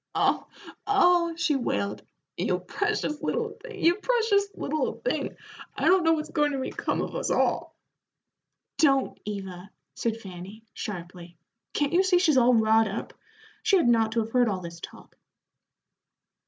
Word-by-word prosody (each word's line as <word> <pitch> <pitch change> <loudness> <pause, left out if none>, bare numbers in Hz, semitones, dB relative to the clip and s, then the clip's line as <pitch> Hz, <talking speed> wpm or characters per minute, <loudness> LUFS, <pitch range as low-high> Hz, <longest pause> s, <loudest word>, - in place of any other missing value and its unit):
"Oh, - - +1 0.4
oh!" 355 -4 +4
she 325 -3 +1
wailed, 105 - -2 0.3
"you 180 - 0
precious 300 - -2
little 460 -2 -1
thing, 460 -5 -9
you 345 +3 +5
precious 440 -3 +2
little 310 +2 -1
thing, - - -3 0.4
I - - -1
don't 370 -1 +5
know 325 0 +4
what's 310 0 -3
goin' 295 -2 +1
to - - -1
become 260 - -2
of - - -6
us - - -2
all." - - 0 1.0
"Don't, 275 -4 +3
Eva," 195 -2 -6 0.2
said 225 -1 -2
Fanny, 195 +2 -10
sharply; 175 -4 -7 0.4
"can't 290 +1 0
you 360 - +5
see 380 -2 +3
she's 325 -6 +3
all 245 0 +5
wrought 220 0 +4
up? 200 +3 -5 0.5
She 400 -3 +4
hadn't 240 -9 +4
ought 225 -1 +1
to 230 - +2
have 220 +1 -5
heard 245 -1 +3
all 190 -3 -2
this 170 -1 -8
talk." - - -12
265 Hz, 155 wpm, -26 LUFS, -, 1.0 s, you